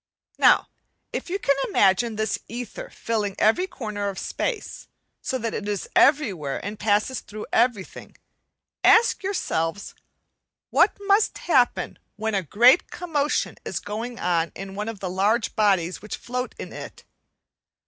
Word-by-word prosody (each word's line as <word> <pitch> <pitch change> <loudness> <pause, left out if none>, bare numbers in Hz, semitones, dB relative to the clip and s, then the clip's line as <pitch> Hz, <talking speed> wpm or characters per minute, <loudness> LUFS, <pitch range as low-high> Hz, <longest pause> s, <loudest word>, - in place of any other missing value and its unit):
Now - - +5 0.5
if - - -4
you 380 - -1
can 280 -8 +2
imagine 205 +4 +3
this 215 -1 -1
ether 245 - -7
filling 210 -4 -2
every 290 - +3
corner 210 - -4
of 195 - -7
space, - - -4 0.3
so 260 - -2
that 230 -2 -3
it 205 - -4
is 205 -3 -2
everywhere 200 - +3
and 205 +1 -5
passes 215 +5 +1
through 210 +1 -8
everything, 230 -5 0 0.7
ask 460 +1 +5
yourselves, 205 - -2 0.8
what - - +4
must 405 +2 +2
happen 255 -8 +1 0.2
when 220 +1 -2
a 195 - +1
great 240 - +5
commotion 300 -5 -1
is - - -3
going 230 +4 -5
on 170 -2 0
in 195 0 -7
one 210 +3 -4
of 220 -4 -8
the 190 - -2
large 205 +5 +1
bodies 190 -5 +2
which 210 - -5
float 250 +1 -4
in - - -8
it? - - -9
215 Hz, 145 wpm, -24 LUFS, 200-255 Hz, 0.8 s, Now